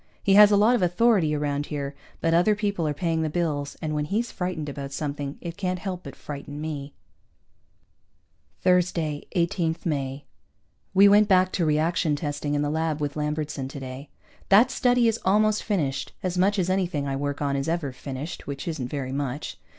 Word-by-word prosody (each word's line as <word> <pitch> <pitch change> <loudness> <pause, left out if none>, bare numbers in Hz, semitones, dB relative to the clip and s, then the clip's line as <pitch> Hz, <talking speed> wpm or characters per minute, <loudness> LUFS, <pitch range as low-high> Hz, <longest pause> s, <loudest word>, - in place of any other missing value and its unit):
He 195 - +3
has 205 +1 +9
a 205 - +4
lot 215 +4 +5
of 235 - 0
authority 180 -3 +3
around 145 0 -1
here, 140 -2 -4 0.3
but 165 0 +2
other 180 +6 +4
people 200 -6 -1
are - - +1
paying 165 +2 -1
the 160 - 0
bills, 150 -4 -2
and 155 -1 -2
when 150 -1 -1
he's 225 +8 -1
frightened 180 -4 -3
about 140 -1 -6
something, 145 0 -4
it 170 -1 -6
can't 185 -2 -1
help 185 -1 -5
but 140 -4 -10
frighten 145 0 -7
me. 150 -2 -5 1.7
Thursday, 170 -5 +1
18 170 -2 +1
May. 140 -3 -2 0.7
We 200 +2 +8
went 205 +1 +6
back 185 -1 +4
to 170 - 0
reaction 155 +1 +1
testing 145 -1 -3
in 145 - +1
the 145 - -1
lab 160 -1 -1
with 145 -1 -2
Lambertson 150 -2 -2
today. 135 0 -8 0.4
That 225 +6 +6
study 245 -1 +3
is 225 0 +1
almost 215 +2 +3
finished, 150 -11 -1
as 185 -1 -1
much 195 +3 +2
as 180 -2 +1
anything 175 -7 0
I 135 - -1
work 145 +1 -2
on 140 -1 0
is 140 +3 -1
ever 165 -5 -1
finished, 135 +4 -7
which 140 +1 -5
isn't 155 -7 -3
very 130 -1 -4
much. 140 +1 -4
155 Hz, 185 wpm, -25 LUFS, 145-185 Hz, 1.7 s, has